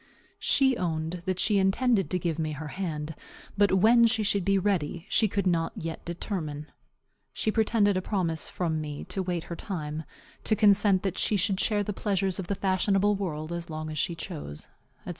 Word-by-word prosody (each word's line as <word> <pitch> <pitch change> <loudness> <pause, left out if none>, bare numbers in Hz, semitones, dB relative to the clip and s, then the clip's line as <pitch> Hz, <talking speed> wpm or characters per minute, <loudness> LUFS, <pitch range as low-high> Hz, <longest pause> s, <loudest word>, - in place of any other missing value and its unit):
She 265 -2 +3
owned 165 -1 -2
that 185 -1 0
she 205 0 +3
intended 195 +2 +2
to 185 - 0
give 165 -2 -2
me 155 -1 -1
her 150 +1 -6
hand, 160 -4 -4 0.4
but 205 0 +4
when 230 +5 +6
she 225 -1 +1
should 200 -2 +1
be 195 +2 +3
ready 180 -4 -1
she 220 - +4
could 200 -1 -1
not 165 -2 +1
yet 165 0 -5
determine. 160 -4 -4 0.6
She 215 - 0
pretended 215 -2 +2
a 185 - 0
promise 175 -5 0
from 160 -3 -1
me 150 -1 -5
to 195 - -3
wait 175 -2 -2
her 170 - -6
time, 155 -4 -5 0.4
to 215 - +3
consent 205 -2 +4
that 190 -2 -2
she 210 - +2
should 195 0 0
share 205 -1 +1
the 210 - -3
pleasures 195 -2 -1
of 185 - -4
the 200 - -1
fashionable 195 +2 +2
world 165 -4 -4
as 170 0 -5
long 155 0 -5
as 155 - -4
she 170 +1 0
chose, 150 - -7 0.4
&c. - - -7
185 Hz, 195 wpm, -28 LUFS, 160-205 Hz, 0.6 s, when